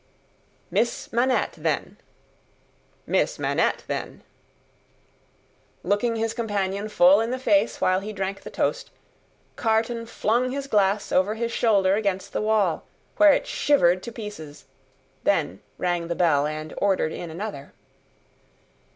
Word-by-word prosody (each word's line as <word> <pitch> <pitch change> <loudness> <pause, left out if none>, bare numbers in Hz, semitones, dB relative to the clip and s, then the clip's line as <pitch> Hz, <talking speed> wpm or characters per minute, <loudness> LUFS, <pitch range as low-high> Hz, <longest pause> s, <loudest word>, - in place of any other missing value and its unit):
"Miss 235 - -1
Manette, 250 +2 +1
then!" - - -2 1.1
"Miss - - 0
Manette, - - 0
then!" - - -5 1.6
Looking 230 +3 +1
his 225 0 -1
companion 205 -2 -2
full 195 +1 +5
in 225 - -1
the 255 - -2
face 220 -4 +2
while 185 0 +2
he 205 +2 -6
drank 195 -1 -4
the - - -9
toast, - - -2 0.7
Carton 230 +1 0
flung 235 +3 0
his 275 +1 -4
glass 205 -4 +1
over 195 +4 +2
his 235 +1 -2
shoulder 200 -6 +3
against 200 -2 -1
the - - -1
wall, 215 -6 +1 0.3
where 310 -1 +7
it - - 0
shivered 185 -11 +2
to 235 - -7
pieces; 205 -10 -9 0.6
then, - - 0 0.2
rang 175 -2 -1
the 170 - -2
bell, 150 -5 +2
and 155 0 -6
ordered 195 -5 +1
in 175 - -6
another. 165 -4 -6
205 Hz, 130 wpm, -24 LUFS, 185-230 Hz, 1.6 s, where